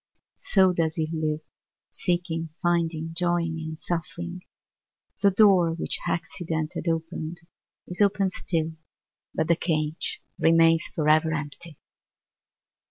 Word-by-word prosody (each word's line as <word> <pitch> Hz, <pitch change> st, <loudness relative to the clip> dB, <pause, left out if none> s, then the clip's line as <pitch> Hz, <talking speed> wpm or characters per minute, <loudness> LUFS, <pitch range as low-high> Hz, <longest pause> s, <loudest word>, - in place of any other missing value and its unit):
So 190 Hz, -2 st, +4 dB
does 160 Hz, -2 st, 0 dB
he 160 Hz, -3 st, -1 dB
live, 155 Hz, -1 st, -1 dB, 0.5 s
seeking, 170 Hz, -2 st, -1 dB
finding, 165 Hz, -2 st, 0 dB
joying 170 Hz, -1 st, 0 dB
and 160 Hz, 0 st, -6 dB
suffering. 175 Hz, +2 st, -4 dB, 0.8 s
The 200 Hz, -, +6 dB
door 190 Hz, -4 st, +5 dB
which 165 Hz, -, -3 dB
accident 160 Hz, -2 st, -2 dB
had -, -, -5 dB
opened 165 Hz, 0 st, -3 dB, 0.4 s
is 180 Hz, +3 st, -5 dB
opened 200 Hz, -1 st, +3 dB
still, 165 Hz, -3 st, -2 dB, 0.6 s
but 160 Hz, -, +1 dB
the 170 Hz, -, +4 dB
cage 155 Hz, -1 st, -1 dB, 0.2 s
remains 165 Hz, 0 st, +5 dB
forever 155 Hz, +1 st, +3 dB
empty! 150 Hz, +1 st, -6 dB
165 Hz, 110 wpm, -26 LUFS, 160-175 Hz, 0.8 s, The